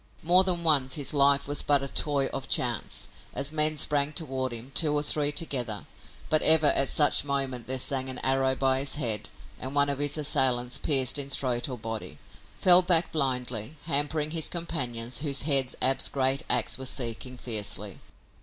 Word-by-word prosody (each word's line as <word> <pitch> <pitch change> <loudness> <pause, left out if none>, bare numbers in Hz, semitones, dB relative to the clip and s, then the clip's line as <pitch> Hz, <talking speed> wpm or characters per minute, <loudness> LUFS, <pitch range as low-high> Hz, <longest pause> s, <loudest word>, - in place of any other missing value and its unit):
More 180 +3 +5
than 180 -2 -1
once 140 -5 +3
his 145 -2 -3
life 140 -1 +2
was 145 0 +1
but 145 -2 +1
a - - -3
toy 140 0 0
of 135 - -5
chance 120 -4 0 0.3
as 140 +1 0
men 155 0 +1
sprang 145 0 0
toward 130 -6 -4
him, 120 +3 -6
two 150 -3 +2
or 145 - 0
three 150 -1 +2
together, 125 -9 -3 0.4
but 155 - +1
ever 160 -1 +4
at 135 -2 +2
such 145 -1 +4
moment 135 -4 -3
there 130 +1 -2
sang 130 0 0
an 130 - -4
arrow 130 0 +1
by 130 0 0
his 140 +1 -1
head 115 -8 0 0.3
and 130 +2 -6
one 145 0 +3
of 140 -1 -3
his 145 +1 -1
assailants, 130 -4 0
pierced 135 -2 +1
in 140 -1 -3
throat 125 -2 -1
or 125 - -6
body, 110 -8 -7 0.4
fell 180 0 +7
back 175 -2 +1
blindly, 125 -4 -2
hampering 150 0 0
his 160 -1 0
companions, 125 -9 -2
whose 140 -3 -1
heads 135 -4 +1
Ab's 130 +1 +1
great 135 +1 0
ax 125 +1 +1
was 130 -1 -5
seeking 125 0 -3
fiercely. 110 -5 -2
140 Hz, 180 wpm, -26 LUFS, 130-150 Hz, 0.4 s, fell